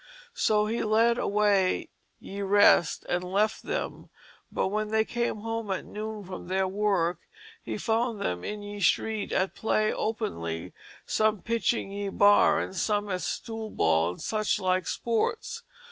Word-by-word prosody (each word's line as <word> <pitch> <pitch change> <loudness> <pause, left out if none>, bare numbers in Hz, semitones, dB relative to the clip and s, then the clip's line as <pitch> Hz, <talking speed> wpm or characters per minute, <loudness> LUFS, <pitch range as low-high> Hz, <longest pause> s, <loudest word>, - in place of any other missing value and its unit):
So 210 - +2
he 225 +2 -1
led 230 +2 +3
away 200 -2 +2 0.3
ye 200 +1 -7
rest 200 -4 +4
and 175 0 0
left 200 +4 0
them; - - -4 0.4
but - - 0
when 215 +1 -1
they 220 +1 +2
came 235 -3 -2
home 225 -1 -3
at 190 - -2
noon 215 0 -6
from 185 -1 -8
their 190 +1 +1
work 190 -3 0 0.4
he - - -5
found 230 -1 0
them 90 - -2
in 210 0 -5
ye 205 0 -7
street 210 +3 +1
at 190 0 0
play 215 -1 +1
openly, 85 - -3 0.3
some 215 -2 +1
pitching 230 -2 0
ye 200 0 -3
bar, 205 +1 +5
and - - -4
some 205 +2 0
at 180 -1 -2
stoolball 145 - 0
and - - -13
such 215 -1 0
like 185 -1 0
sports. 235 - -1
210 Hz, 150 wpm, -28 LUFS, 190-220 Hz, 0.4 s, bar